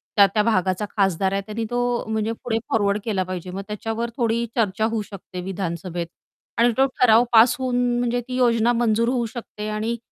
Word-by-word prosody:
त्या-त्या 200 +1 +5
भागाचा 190 -2 +1
खासदार 190 -1 +2
आहे, 195 - 0
त्यानी 220 +1 -4
तो 245 - 0 0.2
अ, - - -14
म्हणजे 220 0 -1
पुढे 225 -2 0
फॉरवर्ड 205 -2 +1
केला 195 -5 0
पाहिजे, 185 -1 -6
मग 195 - -5
त्याच्यावर 225 +2 -3
थोडी 235 -1 +1
चर्चा 215 -1 +1
होऊ 225 -1 -1
शकते 185 -2 -8
विधानसभेत. 175 -2 -4 0.5
आणि 240 +1 +4
तो 265 - +5
ठराव 235 -1 +6
पास 230 +3 +7
होऊन, 255 -1 -1 0.2
म्हणजे 245 0 0
ती 255 - -4
योजना 235 -2 +3
मंजूर 230 0 +2
होऊ 245 -2 0
शकते 215 -3 -7
आणि 220 +2 -2
220 Hz, 185 wpm, -23 LUFS, 195-235 Hz, 0.5 s, पास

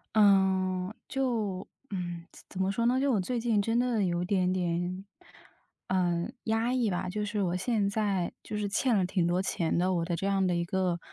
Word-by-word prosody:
呃， 190 -2 +3
就 225 -8 -1 0.2
嗯， 175 -3 -4
怎 - - -16
怎 190 - -4
么 190 - +1
说 230 +4 0
呢， 250 +2 +3
就 275 0 +2
我 210 - +2
最 240 +6 -1
近 225 -2 +1
真 225 +3 0
的 245 -4 +1
有 175 -2 0
一 - - -1
点 185 -1 +1
点， 180 +1 -1 0.8
呃， 175 -2 +1 0.2
压 225 +2 +1
抑 250 -4 +1
吧。 180 +1 -2
就 210 +2 -2
是 210 0 -2
我 180 -2 0
现 205 +1 +1
在， 200 -4 0
就 - - -6
是 205 -1 -1
欠 235 +4 +2
了 190 -3 +2
挺 180 -2 +1
多 175 +2 +1
钱 170 -3 -1
的， 180 +2 +2
我 170 -2 0
的 170 0 -1
这 195 +4 -2
样 195 -1 +2
的 180 -1 +1
一 170 - 0
个 180 -1 0
190 Hz, 225 characters per minute, -29 LUFS, 180-215 Hz, 0.8 s, 呃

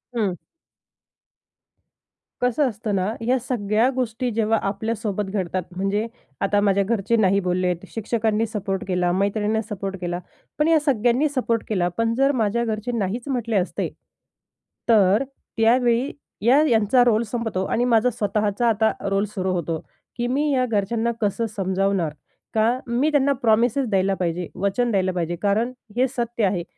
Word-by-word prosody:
हं. 210 -5 +1 2.1
कसं 250 +3 +2
असतं 215 -2 -3
ना, 190 +3 0
या 250 +3 +2
सगळ्या 225 -1 +1
गोष्टी 250 0 -1
जेव्हा 225 0 +1
आपल्यासोबत 210 -1 -2
घडतात, 185 -2 -2
म्हणजे 195 +4 0 0.3
आता 205 +1 +2
माझ्या 200 -1 +3
घरचे 215 +1 0
नाही 200 -3 +3
बोललेत. 180 -1 -1
शिक्षकांनी 225 0 0
सपोर्ट 200 -3 -3
केला, 180 -1 +1
मैत्रिणींना 205 +3 0
सपोर्ट 195 -2 -4
केला. 175 0 -2 0.4
पण 300 - +3
या 325 -1 +5
सगळ्यांनी 260 0 +2
सपोर्ट 240 -5 0
केला. 185 -5 +1
पण 230 0 +1
जर 275 +3 +3
माझ्या 220 +3 +1
घरचे 220 +2 -2
नाहीच 220 +6 -2
म्हटले 235 -5 -1
असते, 185 -1 0 1.0
तर 210 +1 +5 0.3
त्यावेळी 240 +3 +3 0.3
या 265 +5 +6
यांचा 225 +1 +4
रोल 235 -1 +3
संपतो 225 -4 -2
आणि 240 +5 0
माझा 235 0 +4
स्वतःचा 210 +1 0
आता 220 0 +2 0.2
रोल 195 +1 +1
सुरू 185 -1 -1
होतो, 165 -2 -2 0.4
की 240 0 -1
मी 290 +4 +1
या 255 -2 +2
घरच्यांना 225 +1 0
कसं 210 +2 0
समजावणार? 190 -3 0 0.4
का 230 +3 +2
मी 250 +6 +1
त्यांना 280 -1 +3
प्रॉमिसेस 235 +4 +3
द्यायला 195 -1 +2
पाहिजे? 175 -1 -2
वचन 200 +6 0
द्यायला 190 -2 +1
पाहिजे. 175 -1 -2
कारण 215 +4 +1 0.3
हे 260 - +4
सत्य 235 -3 -3
आहे, 185 -3 0
220 Hz, 150 wpm, -23 LUFS, 195-240 Hz, 2.1 s, या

